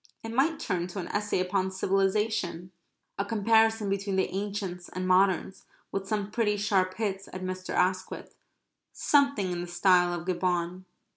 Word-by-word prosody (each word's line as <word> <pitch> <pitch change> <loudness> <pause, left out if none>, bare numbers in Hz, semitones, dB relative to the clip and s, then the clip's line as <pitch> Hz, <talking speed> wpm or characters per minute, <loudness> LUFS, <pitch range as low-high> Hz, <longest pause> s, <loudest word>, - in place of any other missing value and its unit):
It 225 - -5
might 295 +6 +2
turn 180 -3 -2
to 185 +2 -6
an 175 - -5
essay 205 -2 -1
upon 185 +1 0
civilization. 195 -1 0 0.5
A - - +2
comparison 220 +1 +3
between 195 0 -1
the 190 - 0
ancients 195 -3 -4
and 185 0 -4
moderns, 190 0 +2 0.3
with 195 0 -3
some 210 -1 -2
pretty 210 -2 +1
sharp 190 -2 +1
hits 195 -3 -3
at 185 0 -6
Mr. 185 0 -5
Asquith 185 +1 -1 0.6
something 280 -10 +2
in 175 -1 -3
the 175 - -5
style 175 0 +3
of 170 - -10
Gibbon. 180 0 -1
190 Hz, 155 wpm, -28 LUFS, 185-210 Hz, 0.6 s, comparison